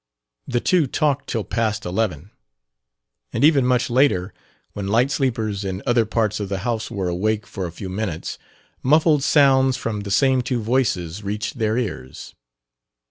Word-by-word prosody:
The 125 Hz, -2 st, 0 dB
two 170 Hz, +2 st, +2 dB
talked 145 Hz, +1 st, 0 dB
till 115 Hz, -3 st, -1 dB
past 105 Hz, +2 st, -1 dB
eleven; 90 Hz, -2 st, -2 dB, 1.0 s
and -, -, -1 dB
even 145 Hz, -4 st, +5 dB
much 125 Hz, -1 st, +2 dB
later, 120 Hz, -7 st, +2 dB, 0.4 s
when 100 Hz, -1 st, -4 dB
light 120 Hz, +7 st, +2 dB
sleepers 110 Hz, -8 st, -1 dB
in 95 Hz, 0 st, -4 dB
other 120 Hz, -3 st, +2 dB
parts 110 Hz, -1 st, 0 dB
of 100 Hz, -2 st, -4 dB
the 100 Hz, -, -2 dB
house 115 Hz, -2 st, -2 dB
were 100 Hz, -6 st, -3 dB
awake 105 Hz, +5 st, -1 dB
for 95 Hz, -4 st, -5 dB
a -, -, -8 dB
few 95 Hz, +3 st, -7 dB
minutes, 95 Hz, -3 st, -4 dB, 0.4 s
muffled 155 Hz, +1 st, +4 dB
sounds 135 Hz, -2 st, +4 dB
from 115 Hz, -3 st, -3 dB
the 100 Hz, 0 st, -6 dB
same 130 Hz, +5 st, +3 dB
two 125 Hz, 0 st, -2 dB
voices 105 Hz, -7 st, -1 dB
reached 105 Hz, +2 st, -4 dB
their 110 Hz, 0 st, +1 dB
ears. 95 Hz, -, -5 dB
110 Hz, 160 wpm, -22 LUFS, 100-130 Hz, 1.0 s, even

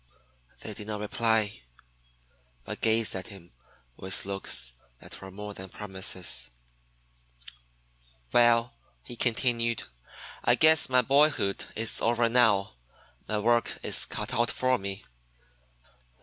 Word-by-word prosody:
They -, -, -6 dB
did 105 Hz, -, -10 dB
not 105 Hz, -1 st, -4 dB
reply, 110 Hz, -, 0 dB, 1.0 s
but -, -, -6 dB
gazed 110 Hz, -1 st, +1 dB
at 95 Hz, -1 st, -5 dB
him 95 Hz, -4 st, -12 dB, 0.5 s
with 95 Hz, 0 st, 0 dB
looks 95 Hz, -11 st, +1 dB, 0.3 s
that -, -, -10 dB
were 95 Hz, -, -10 dB
more 105 Hz, +2 st, -8 dB
than 95 Hz, -1 st, -8 dB
promises. 95 Hz, -6 st, +1 dB, 1.8 s
"Well," 120 Hz, 0 st, +3 dB, 0.3 s
he 120 Hz, -, -9 dB
continued, 115 Hz, -, 0 dB, 0.6 s
"I -, -, +4 dB
guess 160 Hz, -3 st, +5 dB
my 125 Hz, -1 st, +3 dB
boyhood 140 Hz, -6 st, +2 dB
is 115 Hz, +1 st, +1 dB
over 120 Hz, 0 st, +1 dB
now. 105 Hz, -, +2 dB, 0.5 s
My 110 Hz, -, -2 dB
work 120 Hz, +2 st, 0 dB
is -, -, +3 dB
cut -, -, -5 dB
out 120 Hz, 0 st, +1 dB
for 130 Hz, 0 st, 0 dB
me. 95 Hz, 0 st, -6 dB
110 Hz, 120 wpm, -27 LUFS, 100-120 Hz, 1.8 s, guess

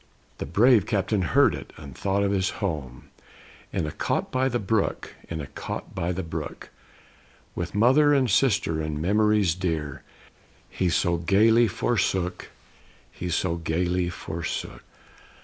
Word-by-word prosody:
The -, -, -4 dB
brave 115 Hz, -2 st, +4 dB
captain 100 Hz, -1 st, 0 dB
heard 85 Hz, -, +4 dB
it, -, -, -8 dB
and 70 Hz, -3 st, -10 dB
thought 100 Hz, +1 st, 0 dB
of 100 Hz, -, +1 dB
his 95 Hz, -2 st, +1 dB
home, 75 Hz, -10 st, -4 dB, 0.6 s
In -, -, -1 dB
a 75 Hz, -, -4 dB
cot -, -, -2 dB
by 130 Hz, +1 st, +1 dB
the 120 Hz, -, 0 dB
brook; 110 Hz, -1 st, -1 dB, 0.2 s
in 80 Hz, -, -4 dB
a -, -, -5 dB
cot -, -, -7 dB
by 85 Hz, +2 st, -2 dB
the 95 Hz, +1 st, -3 dB
brook. 80 Hz, -2 st, -6 dB, 0.8 s
With -, -, -5 dB
mother 135 Hz, +7 st, +5 dB
and 135 Hz, -3 st, +3 dB
sister 100 Hz, -8 st, +2 dB
and 75 Hz, -1 st, -3 dB
memories 105 Hz, +1 st, +3 dB
dear, 80 Hz, -6 st, -3 dB, 0.7 s
He 90 Hz, -, 0 dB
so 85 Hz, 0 st, +1 dB
gayly 110 Hz, +7 st, +4 dB
forsook; 95 Hz, -3 st, -1 dB, 0.6 s
he 90 Hz, -, -5 dB
so 85 Hz, 0 st, 0 dB
gayly 85 Hz, +2 st, 0 dB
forsook. 85 Hz, -1 st, -5 dB
95 Hz, 145 wpm, -25 LUFS, 85-105 Hz, 0.8 s, mother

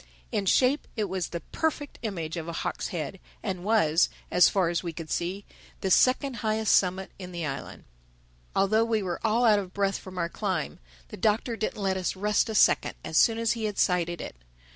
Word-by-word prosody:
In 195 Hz, -, -1 dB
shape 260 Hz, +8 st, +3 dB
it 215 Hz, -, 0 dB
was 190 Hz, -3 st, -2 dB
the 170 Hz, 0 st, -5 dB
perfect 300 Hz, -, -3 dB
image 170 Hz, -8 st, -4 dB
of 165 Hz, -1 st, -5 dB
a 170 Hz, -, -4 dB
hawk's -, -, -3 dB
head, -, -, -5 dB, 0.2 s
and 180 Hz, -1 st, -3 dB
was, 180 Hz, -7 st, +3 dB, 0.2 s
as 180 Hz, 0 st, +6 dB
far 185 Hz, -4 st, +1 dB
as 170 Hz, -1 st, 0 dB
we 170 Hz, -, -4 dB
could 160 Hz, -1 st, -8 dB
see, 185 Hz, +4 st, -2 dB, 0.4 s
the 190 Hz, -, -1 dB
second 255 Hz, -, +3 dB
highest 220 Hz, -2 st, +2 dB
summit 190 Hz, 0 st, +1 dB
in 180 Hz, -1 st, -7 dB
the 170 Hz, -2 st, -4 dB
island. 135 Hz, -2 st, -6 dB, 0.7 s
Although 215 Hz, +3 st, +3 dB
we 220 Hz, -3 st, 0 dB
were 175 Hz, -2 st, -3 dB
all 230 Hz, +2 st, +3 dB
out 215 Hz, -3 st, +5 dB
of 185 Hz, -2 st, -7 dB
breath 195 Hz, -1 st, 0 dB
from 185 Hz, -1 st, -11 dB
our 170 Hz, -1 st, 0 dB
climb, 185 Hz, -3 st, -3 dB, 0.3 s
the -, -, -8 dB
Doctor 220 Hz, +4 st, +1 dB
didn't 220 Hz, -1 st, -3 dB
let 190 Hz, -1 st, 0 dB
us 185 Hz, 0 st, -2 dB
rest 210 Hz, +3 st, +1 dB
a 220 Hz, -, -3 dB
second -, -, +4 dB
as 160 Hz, -, -5 dB
soon 225 Hz, +6 st, +5 dB
as 230 Hz, -1 st, +1 dB
he 230 Hz, -1 st, -2 dB
had 210 Hz, -2 st, -3 dB
sighted 175 Hz, -1 st, +1 dB
it. -, -, -7 dB
195 Hz, 205 wpm, -27 LUFS, 175-220 Hz, 0.7 s, as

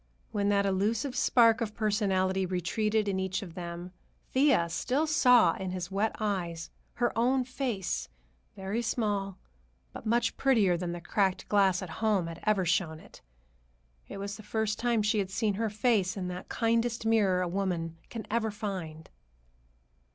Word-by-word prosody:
When 205 Hz, -1 st, 0 dB
that 200 Hz, -1 st, +2 dB
elusive 210 Hz, +7 st, 0 dB
spark 230 Hz, -2 st, +4 dB
of 215 Hz, -2 st, -3 dB
personality 195 Hz, -3 st, +1 dB
retreated 210 Hz, +4 st, 0 dB
in 190 Hz, -1 st, 0 dB
each 190 Hz, +1 st, -2 dB
of 175 Hz, -4 st, -9 dB
them, 175 Hz, 0 st, -6 dB, 0.4 s
Thea 260 Hz, -, +3 dB
still 260 Hz, -, 0 dB
saw 250 Hz, -, +5 dB
in 190 Hz, -1 st, -5 dB
his 180 Hz, 0 st, -5 dB
wet 205 Hz, +3 st, 0 dB
eyes 175 Hz, -6 st, -3 dB, 0.2 s
her 240 Hz, 0 st, 0 dB
own 255 Hz, +3 st, +2 dB
face, 220 Hz, -, -3 dB, 0.5 s
very 195 Hz, +4 st, -2 dB
small, 205 Hz, -4 st, -1 dB, 0.6 s
but -, -, -8 dB
much 235 Hz, +1 st, +1 dB
prettier 220 Hz, -10 st, +3 dB
than 175 Hz, 0 st, -3 dB
the 175 Hz, -, -6 dB
cracked 190 Hz, +2 st, 0 dB
glass 195 Hz, -2 st, +3 dB
at 175 Hz, -, -7 dB
home 210 Hz, -5 st, +2 dB
had 165 Hz, 0 st, -7 dB
ever 205 Hz, -3 st, +3 dB
shown 165 Hz, -2 st, 0 dB
it. -, -, -16 dB, 0.9 s
It -, -, -8 dB
was 200 Hz, +1 st, -5 dB
the -, -, -10 dB
first 215 Hz, 0 st, -2 dB
time 235 Hz, -2 st, +1 dB
she 210 Hz, 0 st, +2 dB
had 195 Hz, -2 st, -1 dB
seen 210 Hz, +1 st, 0 dB
her 220 Hz, +3 st, -1 dB
face 210 Hz, -3 st, +1 dB
in 180 Hz, -2 st, -3 dB
that 180 Hz, +1 st, -7 dB
kindest 230 Hz, 0 st, 0 dB
mirror 200 Hz, -5 st, +3 dB
a -, -, -1 dB
woman 170 Hz, -3 st, -2 dB
can 225 Hz, -3 st, -6 dB
ever 225 Hz, -1 st, +1 dB
find. 190 Hz, -7 st, -5 dB
200 Hz, 165 wpm, -29 LUFS, 185-225 Hz, 0.9 s, saw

